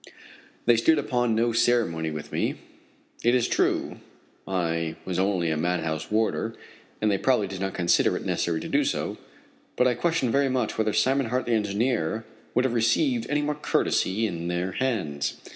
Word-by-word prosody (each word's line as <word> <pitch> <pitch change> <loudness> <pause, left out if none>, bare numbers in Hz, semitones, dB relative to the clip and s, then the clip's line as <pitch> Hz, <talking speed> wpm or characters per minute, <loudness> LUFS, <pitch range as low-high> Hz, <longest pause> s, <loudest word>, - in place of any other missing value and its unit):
They 120 -1 +5
stood 155 +8 +4
upon 120 -5 0
no 115 +1 +1
ceremony 110 -10 +2
with 75 -1 -7
me. - - -1 0.7
It 120 +1 +4
is 125 - +2
true - - 0 0.5
I 85 -3 -1
was 90 -1 -2
only 95 -4 +1
a 80 - 0
madhouse 80 -2 -1
warder, 110 +1 0 0.4
and 105 -1 +2
they 100 - +1
probably 125 -6 +2
did 95 -1 -6
not 95 -1 -2
consider 85 -1 +2
it - - -7
necessary 85 -2 0
to - - -5
do - - +2
so; - - -2 0.6
but 125 - +3
I 125 - +3
question 165 -3 0
very 140 +1 +2
much 125 -4 -1
whether 110 -1 +1
Simon 135 -1 +2
Hart, 125 +3 -1
the 120 - -2
engineer, 110 -1 0 0.3
would 125 +2 +3
have 125 - 0
received 230 - +2
any 150 0 +1
more 150 +1 0
courtesy 110 -6 0
at 85 -3 -4
their 90 +2 -1
hands. 90 - -1
110 Hz, 175 wpm, -26 LUFS, 90-125 Hz, 0.7 s, They